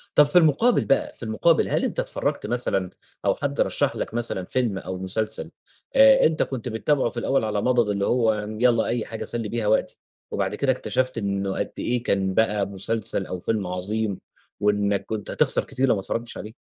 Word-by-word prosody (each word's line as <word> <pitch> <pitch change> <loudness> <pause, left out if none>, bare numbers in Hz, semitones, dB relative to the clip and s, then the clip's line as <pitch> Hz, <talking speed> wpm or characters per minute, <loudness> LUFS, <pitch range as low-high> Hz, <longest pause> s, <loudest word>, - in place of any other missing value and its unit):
طب 150 - +8
في 145 +5 +2
المقابل 175 - +4
بقى 135 - +1
في - - -8
المقابل 155 +9 +2
هل - - +1
أنت - - -2
اتفرجت - - -2
مثلًا 100 -7 -1 0.4
أو - - +3
حد - - -2
رشح - - 0
لك - - -4
مثلًا 115 -6 -2
فيلم 115 -5 -1
أو 95 0 -5
مسلسل 105 +4 -3 0.4
آآ، 270 0 +7
أنت 155 0 +2
كنت 125 -2 -5
بتابعه 120 +3 +1
في 120 - -9
الأول 135 +1 +1
على 105 -1 -1
مضض 120 -3 +2
اللي 100 -1 0
هو 115 -3 +2
يالّا 110 +3 +1
أي 120 -2 -1
حاجة 115 - -6
أسَلّي 115 -3 -3
بيها 115 -3 -2
وقتي، 110 - +1 0.3
وبعد - - -1
كده - - +2
اكتشفت 130 0 -1
إنّه 100 -1 -2
قد - - -2
ايه 120 -1 -1
كان 95 -4 0
بقى 105 -1 +2
مسلسل 100 +1 -2
أو 90 - -5
فيلم 105 0 -1
عظيم 100 +3 -2 0.4
وإنّك 100 -1 +1
كنت 110 -2 -5
هتخسر - - +2
كتير 135 +1 -1
لو 115 - +4
ما 95 - -3
اتفرجتش 115 +4 -4
عليه؟ 105 +1 -8
110 Hz, 195 wpm, -24 LUFS, 100-125 Hz, 0.4 s, طب